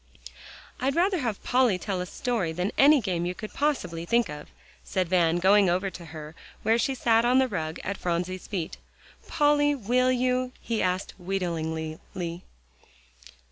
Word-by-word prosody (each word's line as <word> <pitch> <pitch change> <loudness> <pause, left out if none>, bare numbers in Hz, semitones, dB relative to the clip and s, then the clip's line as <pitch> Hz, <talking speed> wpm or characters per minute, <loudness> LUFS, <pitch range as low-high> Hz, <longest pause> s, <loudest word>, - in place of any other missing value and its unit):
"I'd 270 +2 0
rather 365 +2 +2
have 230 -7 -3
Polly 250 -6 +3
tell 185 0 -3
a 180 - -4
story 220 -6 -2
than 180 +4 -1
any 285 0 +6
game 175 -4 -1
you 180 - -3
could 215 - -8
possibly 180 - -1
think 235 +7 +2
of," 150 0 -8 0.3
said 185 -3 -1
Van, 170 -2 +3
going 195 +2 +5
over 185 +2 0
to 175 - -10
her, 155 -1 -9 0.3
where 225 +2 +3
she 270 +1 0
sat 230 -2 +3
on 245 +2 +4
the 265 0 +4
rug 160 -8 -4
at 200 0 -3
Phronsie's 180 +1 -3
feet. 180 -6 -4 0.5
"Polly, 290 -1 +3
will 255 +1 +2
you?" 255 0 0
he 230 -2 -2
asked 185 +1 -1
wheedlingly. 160 -4 -3
195 Hz, 160 wpm, -27 LUFS, 175-250 Hz, 0.5 s, any